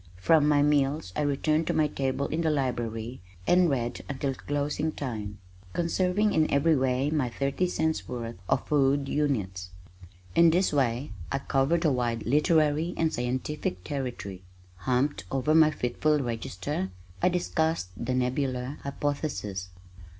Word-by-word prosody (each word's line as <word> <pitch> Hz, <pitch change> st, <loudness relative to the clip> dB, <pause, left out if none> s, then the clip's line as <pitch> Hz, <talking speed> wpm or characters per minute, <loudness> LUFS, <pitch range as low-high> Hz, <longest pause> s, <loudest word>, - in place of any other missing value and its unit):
From 150 Hz, -, +4 dB
my 145 Hz, -1 st, +4 dB
meals 145 Hz, -, +1 dB
I -, -, 0 dB
returned 155 Hz, +2 st, +1 dB
to -, -, 0 dB
my 155 Hz, -, +4 dB
table 135 Hz, -1 st, -1 dB
in 160 Hz, -, -1 dB
the 160 Hz, -, +2 dB
library 120 Hz, -5 st, -2 dB, 0.2 s
and 180 Hz, -1 st, +4 dB
read 120 Hz, -3 st, -2 dB
until 135 Hz, 0 st, -1 dB
closing 145 Hz, +3 st, -2 dB
time, 110 Hz, -9 st, -5 dB, 0.4 s
conserving 180 Hz, +4 st, +1 dB
in 155 Hz, -1 st, +3 dB
every 155 Hz, +3 st, +4 dB
way 130 Hz, +1 st, +1 dB
my 145 Hz, -6 st, +1 dB
thirty 140 Hz, +8 st, -1 dB
cents' 160 Hz, -2 st, -1 dB
worth 120 Hz, -2 st, -5 dB
of -, -, +1 dB
"food 140 Hz, -1 st, +2 dB
units." 100 Hz, -12 st, -1 dB, 0.6 s
In 170 Hz, 0 st, +6 dB
this 180 Hz, +2 st, +2 dB
way 130 Hz, -2 st, 0 dB, 0.2 s
I 135 Hz, -, +1 dB
covered 135 Hz, +5 st, +1 dB
a 155 Hz, -, +4 dB
wide 120 Hz, -3 st, -1 dB
literary 155 Hz, +4 st, +2 dB
and 160 Hz, -1 st, +1 dB
scientific 125 Hz, -5 st, -2 dB
territory. 120 Hz, -9 st, -5 dB, 0.4 s
Humped 130 Hz, +7 st, 0 dB
over 135 Hz, +3 st, +1 dB
my 160 Hz, -1 st, +7 dB
fitful 150 Hz, +2 st, +1 dB
register 115 Hz, -4 st, -3 dB, 0.3 s
I 180 Hz, -, +4 dB
discussed 160 Hz, -, 0 dB
the 125 Hz, +5 st, -2 dB
Nebular 130 Hz, +1 st, -1 dB
Hypothesis. 140 Hz, -, -3 dB
140 Hz, 145 wpm, -28 LUFS, 125-155 Hz, 0.6 s, my